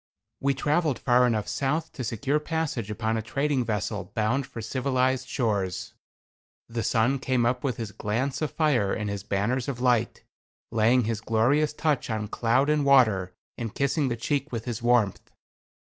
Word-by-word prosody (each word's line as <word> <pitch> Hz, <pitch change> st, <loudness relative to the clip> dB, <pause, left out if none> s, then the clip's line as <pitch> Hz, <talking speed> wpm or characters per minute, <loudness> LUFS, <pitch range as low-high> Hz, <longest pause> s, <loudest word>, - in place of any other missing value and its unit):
We 140 Hz, 0 st, +1 dB
traveled 150 Hz, +1 st, +1 dB
far 125 Hz, 0 st, +3 dB
enough 110 Hz, -3 st, 0 dB
south 155 Hz, +4 st, -1 dB
to 130 Hz, -, -6 dB
secure 130 Hz, +6 st, 0 dB
passage 150 Hz, -8 st, -2 dB
upon 110 Hz, +1 st, -1 dB
a -, -, -1 dB
trading 135 Hz, +4 st, 0 dB
vessel 105 Hz, -3 st, -3 dB
bound 120 Hz, +5 st, 0 dB
for -, -, -9 dB
civilized 130 Hz, +2 st, 0 dB
shores. 100 Hz, -9 st, -1 dB, 0.7 s
The 115 Hz, 0 st, -3 dB
sun 115 Hz, +4 st, +2 dB
came 130 Hz, -2 st, +1 dB
up 125 Hz, +1 st, 0 dB
with 130 Hz, -5 st, -1 dB
his 110 Hz, -3 st, -5 dB
glance 125 Hz, +9 st, -2 dB
of 155 Hz, -, 0 dB
fire 135 Hz, -, +1 dB
and 105 Hz, -1 st, -2 dB
his 100 Hz, -1 st, -4 dB
banners 105 Hz, +6 st, -1 dB
of 135 Hz, -4 st, -3 dB
light, 120 Hz, -2 st, +1 dB, 0.5 s
laying 115 Hz, +3 st, +3 dB
his 110 Hz, -1 st, -2 dB
glorious 120 Hz, +8 st, +2 dB
touch 150 Hz, -4 st, -1 dB
on 110 Hz, -2 st, -2 dB
cloud 125 Hz, +5 st, +2 dB
and 150 Hz, -1 st, +2 dB
water, 110 Hz, -10 st, +4 dB, 0.2 s
and 115 Hz, -3 st, -4 dB
kissing 140 Hz, +1 st, +1 dB
the 120 Hz, -, -1 dB
cheek 140 Hz, +5 st, -1 dB
with 115 Hz, -2 st, -4 dB
his 120 Hz, -2 st, -4 dB
warmth. 120 Hz, -5 st, +1 dB
120 Hz, 170 wpm, -26 LUFS, 110-140 Hz, 0.7 s, water